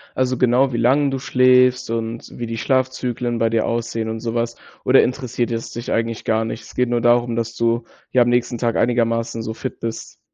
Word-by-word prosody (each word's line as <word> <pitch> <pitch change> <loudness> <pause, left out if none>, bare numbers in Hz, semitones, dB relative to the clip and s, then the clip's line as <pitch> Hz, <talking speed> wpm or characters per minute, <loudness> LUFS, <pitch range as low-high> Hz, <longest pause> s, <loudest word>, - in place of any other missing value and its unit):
Also, 130 -1 0
genau 125 +1 +3
wie - - -1
lange 135 +5 +3
du 135 -1 -3
schläfst 125 -1 +3
und 115 0 -4
wie 120 -1 -4
die 115 0 -4
Schlafzyklen 125 -2 -1
bei 115 0 +2
dir 115 -1 +1
aussehen 115 -1 -2
und 110 0 -4
sowas? 115 0 -2 0.3
Oder - - +5
interessiert 125 -2 -2
es 115 0 -4
dich 120 +1 -6
eigentlich 115 -1 -1
gar 110 0 +1
nicht? 115 0 -5
Es - - -14
geht 125 -1 +1
nur 120 -1 +1
darum, 120 0 +3
dass 115 0 -3
du, 115 0 +1 0.3
ja, 125 - +4
am 120 - 0
nächsten 120 0 +1
Tag 115 -1 0
einigermaßen 115 -1 0
so 110 - -4
fit - - -6
bist? 115 -1 -6
120 Hz, 210 wpm, -20 LUFS, 115-125 Hz, 0.3 s, Oder